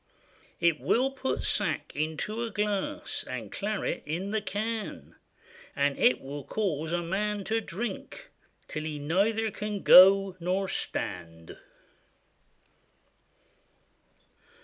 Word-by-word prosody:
It 170 Hz, -3 st, +3 dB
will 260 Hz, +3 st, +2 dB
put 265 Hz, 0 st, -2 dB
sack -, -, 0 dB
into 160 Hz, +9 st, -2 dB
a 235 Hz, -, -2 dB
glass, 205 Hz, -2 st, -2 dB
And 120 Hz, -5 st, -6 dB
claret 210 Hz, 0 st, -2 dB
in 180 Hz, +6 st, -3 dB
the 220 Hz, 0 st, 0 dB
can; 215 Hz, +3 st, -4 dB, 0.6 s
And 140 Hz, 0 st, +1 dB
it 125 Hz, -, +4 dB
will 140 Hz, +1 st, -6 dB
cause 160 Hz, -4 st, -2 dB
a 175 Hz, 0 st, 0 dB
man 205 Hz, +4 st, -1 dB
to 225 Hz, +3 st, 0 dB
drink 240 Hz, -, -6 dB, 0.4 s
Till 155 Hz, -, -4 dB
he 155 Hz, -1 st, -3 dB
neither 205 Hz, +9 st, +1 dB
can 210 Hz, -1 st, -4 dB
go 195 Hz, 0 st, +8 dB
nor 185 Hz, +3 st, 0 dB
stand. 85 Hz, -, -5 dB
195 Hz, 110 wpm, -28 LUFS, 155-215 Hz, 0.6 s, go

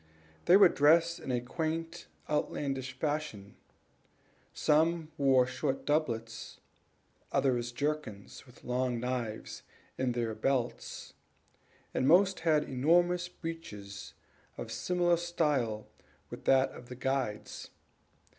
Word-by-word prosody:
They 180 Hz, +3 st, +8 dB
were 200 Hz, -2 st, +9 dB
dressed 165 Hz, +3 st, +4 dB
in 135 Hz, -, -5 dB
a 125 Hz, -, +1 dB
quaint 165 Hz, +6 st, -4 dB, 0.2 s
outlandish 135 Hz, -3 st, -2 dB
fashion; 145 Hz, -10 st, -3 dB, 1.0 s
some 160 Hz, +1 st, +2 dB
wore 135 Hz, -4 st, +4 dB
short 135 Hz, +2 st, -3 dB
doublets, 115 Hz, -7 st, -2 dB, 0.7 s
others 120 Hz, -3 st, +1 dB
jerkins, 140 Hz, -5 st, -4 dB
with 125 Hz, -, -18 dB
long 125 Hz, -1 st, -1 dB
knives 120 Hz, -3 st, -4 dB, 0.4 s
in 130 Hz, -2 st, +1 dB
their 115 Hz, -2 st, -1 dB
belts, 120 Hz, +2 st, -2 dB, 0.8 s
and 130 Hz, -, +1 dB
most 190 Hz, +4 st, +5 dB
of 165 Hz, -, -13 dB
them 160 Hz, -, +5 dB
had 150 Hz, -, +3 dB
enormous 175 Hz, +6 st, +2 dB
breeches 105 Hz, -, -8 dB, 0.4 s
of -, -, -6 dB
similar 175 Hz, -1 st, +1 dB
style 150 Hz, -11 st, 0 dB, 0.5 s
with -, -, -9 dB
that 135 Hz, 0 st, +4 dB
of 120 Hz, -, -12 dB
the 125 Hz, -, -7 dB
guide's. 130 Hz, -4 st, -3 dB
135 Hz, 115 wpm, -31 LUFS, 125-165 Hz, 1.0 s, were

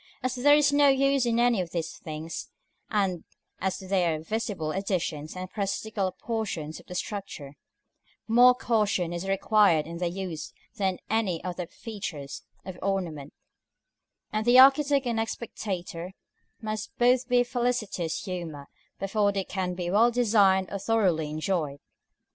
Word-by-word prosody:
As 255 Hz, -1 st, 0 dB
there 280 Hz, +3 st, +5 dB
is 290 Hz, -1 st, +4 dB
no 290 Hz, 0 st, +5 dB
use 275 Hz, -1 st, +3 dB
in 235 Hz, 0 st, +1 dB
any 240 Hz, -4 st, +3 dB
of 175 Hz, -, -5 dB
these 165 Hz, -1 st, -4 dB
things, 160 Hz, +1 st, -6 dB, 0.4 s
and 195 Hz, -5 st, 0 dB, 0.4 s
as 190 Hz, 0 st, -1 dB
they 190 Hz, -1 st, 0 dB
are 160 Hz, -2 st, 0 dB
visible 190 Hz, -3 st, -3 dB
additions 175 Hz, -5 st, -2 dB
and 185 Hz, 0 st, -5 dB
parasitical 200 Hz, 0 st, -2 dB
portions 185 Hz, -8 st, -4 dB
of -, -, -18 dB
the 180 Hz, -, -8 dB
structure, 185 Hz, -8 st, -5 dB, 0.7 s
more 245 Hz, +2 st, +7 dB
caution 210 Hz, -8 st, 0 dB
is 175 Hz, +2 st, -4 dB
required 195 Hz, -4 st, +3 dB
in 170 Hz, +1 st, -7 dB
their 175 Hz, -1 st, 0 dB
use 180 Hz, -3 st, -5 dB, 0.2 s
than 195 Hz, -3 st, +1 dB
in -, -, -12 dB
any 200 Hz, -7 st, 0 dB
other 180 Hz, -1 st, -4 dB
features 170 Hz, -12 st, -7 dB, 0.2 s
of 185 Hz, -1 st, -8 dB
ornament, 170 Hz, -8 st, -2 dB, 1.0 s
and 215 Hz, +2 st, -1 dB
the 245 Hz, +1 st, +7 dB
architect 275 Hz, +1 st, +6 dB
and 235 Hz, -2 st, 0 dB
spectator 185 Hz, -5 st, -5 dB, 0.5 s
must 215 Hz, -1 st, -5 dB
both 250 Hz, +1 st, +3 dB
be 250 Hz, -, +4 dB
in 245 Hz, -, +4 dB
felicitous 235 Hz, -9 st, -1 dB
humor 170 Hz, -7 st, -6 dB, 0.3 s
before 200 Hz, +1 st, +1 dB
they 195 Hz, -1 st, -1 dB
can 185 Hz, -1 st, -3 dB
be 175 Hz, -1 st, -3 dB
well 225 Hz, +5 st, +5 dB
designed 205 Hz, -6 st, +3 dB
or 200 Hz, -, -3 dB
thoroughly 185 Hz, -8 st, +1 dB
enjoyed. 155 Hz, -2 st, -2 dB
195 Hz, 150 wpm, -27 LUFS, 175-230 Hz, 1.0 s, more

